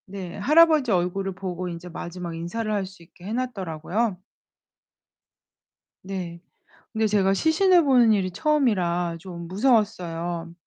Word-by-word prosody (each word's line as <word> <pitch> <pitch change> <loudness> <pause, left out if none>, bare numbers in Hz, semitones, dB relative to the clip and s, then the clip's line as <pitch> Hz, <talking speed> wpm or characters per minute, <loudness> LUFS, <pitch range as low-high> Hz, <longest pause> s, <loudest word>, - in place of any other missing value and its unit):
네, 190 -2 -7
할아버지 305 +2 +4
얼굴을 190 +1 0
보고 180 -1 -5
인제 170 +1 -8
마지막 175 0 -6
인사를 215 +7 -4
할 205 -2 0
수 190 -2 -14
있게 175 +2 -17
해놨더라고요. 205 -3 -2 1.8
네. 180 -3 -6 0.5
근데 220 -1 +1
제가 195 -2 +2
시신을 340 - +4
보는 250 -5 +5
일이 190 -3 0
처음이라 180 - +1
좀 170 -1 -8
무서웠어요. 175 -6 0
190 Hz, 280 characters per minute, -24 LUFS, 175-230 Hz, 1.8 s, 보는